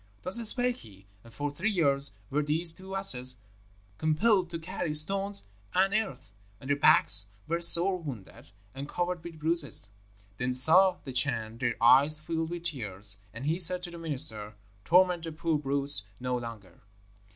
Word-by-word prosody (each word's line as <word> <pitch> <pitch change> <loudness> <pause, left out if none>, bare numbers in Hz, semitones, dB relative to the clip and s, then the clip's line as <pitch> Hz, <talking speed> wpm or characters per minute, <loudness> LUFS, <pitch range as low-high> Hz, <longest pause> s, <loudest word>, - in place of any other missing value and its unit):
"Thus 185 +5 +4
spake 250 0 0
he, 100 -3 -17 0.2
and 115 - -18
for 145 +5 -7
three 180 +9 -4
years 140 - +2 0.2
were 150 +2 -2
these 160 +3 +2
two 190 +2 -11
asses 130 -10 +3 0.6
compelled 180 +4 -1
to 170 - -7
carry 165 -2 -7
stones 195 +6 +4 0.3
and 195 +2 0
earth; 190 - -5 0.3
and 130 +4 -8
their - - +1
backs 125 - +3 0.2
were 170 +2 -4
sore 180 +2 +6
wounded, 125 - -12 0.2
and 140 +2 -10
covered 175 -1 -5
with 170 -2 -12
bruises. 155 -9 +3 0.5
Then 125 +1 -5
saw 180 +8 +3
the 130 - -10
Chan 115 -4 -1
their 120 -3 -3
eyes 140 +6 +4
filled 160 +1 -6
with 175 0 -9
tears, 105 - +1
and 115 +5 -11
he 160 +4 -3
said 180 0 +3
to 175 - -9
the 170 - -12
minister, 130 -10 -1 0.3
'Torment 180 -1 +1
the 165 - -8
poor 160 -1 -4
brutes 140 -6 +3
no 125 0 -5
longer.' 115 -7 -11
155 Hz, 165 wpm, -26 LUFS, 125-175 Hz, 0.6 s, sore